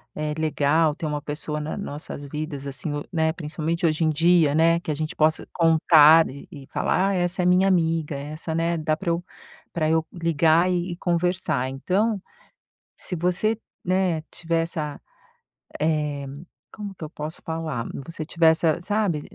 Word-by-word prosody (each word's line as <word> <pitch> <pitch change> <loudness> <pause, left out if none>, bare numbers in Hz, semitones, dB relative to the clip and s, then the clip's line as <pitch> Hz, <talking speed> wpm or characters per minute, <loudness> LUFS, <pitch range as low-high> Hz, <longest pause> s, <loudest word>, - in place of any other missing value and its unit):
eh, 150 0 -2
legal, 155 0 +2
ter 160 - -5
uma 150 -1 -2
pessoa 150 +1 -4
na 150 +1 -4
nossas 145 -5 -7
vidas 150 -2 -5
assim, 145 +1 -4
né, 160 -2 +1
principalmente 165 +2 -3
hoje 160 0 +2
em - - +3
dia, 165 -1 +4
né, 165 +1 +4
que 165 - -9
a - - -1
gente 155 +3 -4
possa 155 +1 +2
contar 160 -1 +6
e 140 +2 -10
e 140 -2 -11
falar: 190 +2 +1
"A - - 0
essa, 180 0 0
eh, - - 0
minha 180 +2 +4
amiga 165 -5 +1
essa 155 +3 -5
né, 165 0 0
dá 155 0 0
para 170 +2 -4
eu 170 +1 0 0.5
para 155 -2 0
eu 160 0 +2
ligar 165 +1 +3
e 175 0 -1
e - - -4
conversar," 175 -6 0
então, 195 +10 0 0.7
se 180 - -6
você, 180 +6 0 0.3
né, 185 -3 +1
tiver 165 -1 -1
essa, 155 -3 -4 0.8
eh, 150 -2 0 0.5
como 205 -2 -7
que - - -10
eu - - -8
posso 155 +1 -7
falar? 160 -7 -3 0.2
Você 165 -2 -6
tiver 165 +1 +2
essa, 160 +1 +1
sabe, 205 -5 0
160 Hz, 170 wpm, -24 LUFS, 150-175 Hz, 0.8 s, contar